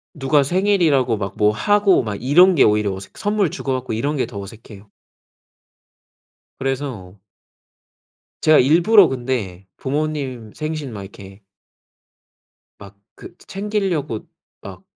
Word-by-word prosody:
누가 145 Hz, 0 st, +2 dB
생일이라고 160 Hz, -, +1 dB
막 100 Hz, -2 st, -5 dB
뭐 105 Hz, 0 st, +3 dB
하고 205 Hz, -, +2 dB
막 105 Hz, -3 st, -4 dB
이런 180 Hz, +7 st, +5 dB
게 -, -, +5 dB
오히려 105 Hz, -2 st, +2 dB
어색 95 Hz, 0 st, -11 dB
선물 205 Hz, -5 st, 0 dB
주고 135 Hz, -, -3 dB
받고 130 Hz, 0 st, -4 dB
이런 140 Hz, +7 st, -2 dB
게 135 Hz, -, 0 dB
더 100 Hz, -, -8 dB
어색해요. 105 Hz, 0 st, -12 dB, 1.7 s
그래서 130 Hz, -8 st, -4 dB, 1.3 s
제가 155 Hz, -1 st, +5 dB
일부러 175 Hz, -, +5 dB
근데 120 Hz, -8 st, -4 dB
부모님 135 Hz, -6 st, -4 dB
생신 155 Hz, -4 st, -5 dB
막 100 Hz, -, -7 dB
이렇게 95 Hz, +1 st, -13 dB, 1.4 s
막 100 Hz, -1 st, -14 dB, 0.2 s
그 -, -, -13 dB
챙길려고 190 Hz, -, -3 dB, 0.4 s
막 -, -, -11 dB
135 Hz, 240 characters per minute, -20 LUFS, 105-160 Hz, 1.7 s, 이런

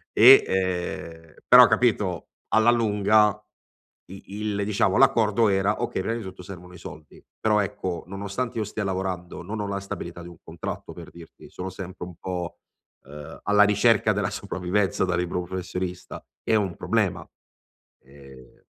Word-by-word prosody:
E 125 Hz, +5 st, +9 dB
ehm 90 Hz, -3 st, -3 dB
però 125 Hz, 0 st, +10 dB
capito, 105 Hz, -7 st, 0 dB, 0.2 s
alla 110 Hz, +1 st, +4 dB
lunga 105 Hz, -2 st, +2 dB, 0.7 s
i 95 Hz, -, -10 dB, 0.2 s
il 105 Hz, -1 st, -2 dB
diciamo 100 Hz, -2 st, +1 dB
l'accordo 110 Hz, 0 st, +4 dB
era: 100 Hz, +2 st, +1 dB
okay -, -, -2 dB
prima 115 Hz, +4 st, -2 dB
di -, -, -6 dB
tutto 95 Hz, -1 st, -9 dB
servono 90 Hz, -1 st, -11 dB
i -, -, -11 dB
soldi. 80 Hz, -3 st, -12 dB, 0.2 s
Però 105 Hz, -1 st, +2 dB
ecco 90 Hz, -3 st, -4 dB
nonostante 100 Hz, +6 st, -4 dB
io -, -, 0 dB
stia 105 Hz, +1 st, -4 dB
lavorando 95 Hz, -2 st, -4 dB
non 110 Hz, +1 st, -5 dB
ho 100 Hz, -, -3 dB
la 100 Hz, 0 st, -3 dB
stabilità 85 Hz, -3 st, -7 dB
di -, -, -10 dB
un 85 Hz, -, -14 dB
contratto 80 Hz, -1 st, -7 dB
per -, -, -11 dB
dirti. 85 Hz, -1 st, -14 dB
Sono 95 Hz, +1 st, -6 dB
sempre 95 Hz, -1 st, -8 dB
un 90 Hz, -, -11 dB
po', 90 Hz, 0 st, -5 dB, 0.5 s
uhm, 75 Hz, +2 st, -10 dB
alla 105 Hz, +1 st, +5 dB
ricerca 105 Hz, +1 st, +3 dB
della 100 Hz, -2 st, -1 dB
sopravvivenza 95 Hz, 0 st, -1 dB
da 90 Hz, -, -1 dB
libero 90 Hz, +1 st, -2 dB
professionista, 90 Hz, 0 st, -6 dB, 0.2 s
è -, -, 0 dB
un 100 Hz, -5 st, 0 dB
problema. -, -, -1 dB, 0.8 s
Ehm 70 Hz, -2 st, -17 dB
95 Hz, 155 wpm, -25 LUFS, 90-105 Hz, 0.8 s, però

